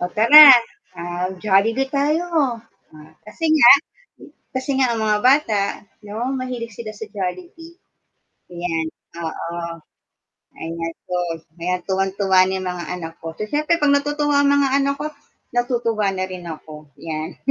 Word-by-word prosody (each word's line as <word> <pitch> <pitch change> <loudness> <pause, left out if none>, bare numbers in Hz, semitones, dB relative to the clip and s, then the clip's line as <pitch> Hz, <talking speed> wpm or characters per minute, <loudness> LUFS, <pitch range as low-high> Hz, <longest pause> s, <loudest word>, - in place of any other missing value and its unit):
"Oh, 180 - -2
tara, 285 +6 +9 0.5
ah, 175 +1 -4
Jollibee 215 +6 +2
tayo," 300 +5 0
o, 275 -7 +1 0.7
kasi 325 +10 -8
nga 255 -6 +7 0.8
kasi 260 +2 -3
nga 265 - +3
ang 230 - -3
mga 210 -1 +2
bata 250 -6 +3 0.4
no 225 +5 -4
mahilig 245 -3 -6
sila 215 -2 -7
sa 220 +1 -8
Jollibee. 330 - -7 0.8
Ayan, 165 -2 -3 0.4
oo. 170 0 -6 0.8
Ay 160 - -6
gastos, 170 0 -4 0.2
kaya 180 +2 -2
tuwang-tuwa 195 0 0
niyan 190 0 -3
mga 180 -1 -4
anak 165 -2 -8
ko, 160 0 -7
so - - -4
siyempre 305 +5 +1
'pag 290 -1 +3
natutuwa 290 0 +1
ang 285 - +3
mga 280 -1 +2
anak 280 0 0
ko, 300 - -2 0.5
natutuwa 235 -4 0
na 185 0 -2
rin 180 -2 -8
ako 155 -1 -10
yan. 155 0 -6
215 Hz, 140 wpm, -20 LUFS, 175-275 Hz, 0.8 s, tara